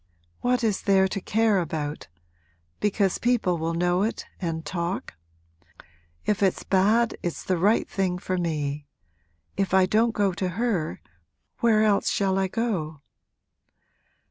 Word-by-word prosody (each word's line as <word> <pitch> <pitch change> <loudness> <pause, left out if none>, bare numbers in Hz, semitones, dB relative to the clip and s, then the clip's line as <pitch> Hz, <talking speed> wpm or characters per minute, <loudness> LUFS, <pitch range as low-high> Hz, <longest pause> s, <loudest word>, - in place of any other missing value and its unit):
'What 250 0 +1
is 215 -4 +1
there 190 -2 +4
to 195 +1 -4
care 220 0 +2
about? 155 -3 -4 0.7
Because 200 -2 +1
people 225 -8 +1
will 165 +1 -2
know 175 +2 +1
it 220 +3 -2
and 165 -3 -3
talk? 170 - -3 1.1
If 210 -1 0
it's 190 -2 +1
bad 215 +5 +2
it's 175 - -4
the 185 -2 0
right 205 +6 +3
thing 185 -2 -1
for 185 0 -2
me! 150 -4 -2 0.7
If 195 -1 +1
I 190 -1 +6
don't 220 +4 +2
go 200 -3 +2
to 185 +1 -2
her 220 -10 -1 0.6
where 220 -2 +4
else 205 -2 +2
shall 195 -1 +1
I 190 - +1
go?' 180 -9 -2
190 Hz, 140 wpm, -25 LUFS, 170-210 Hz, 1.1 s, I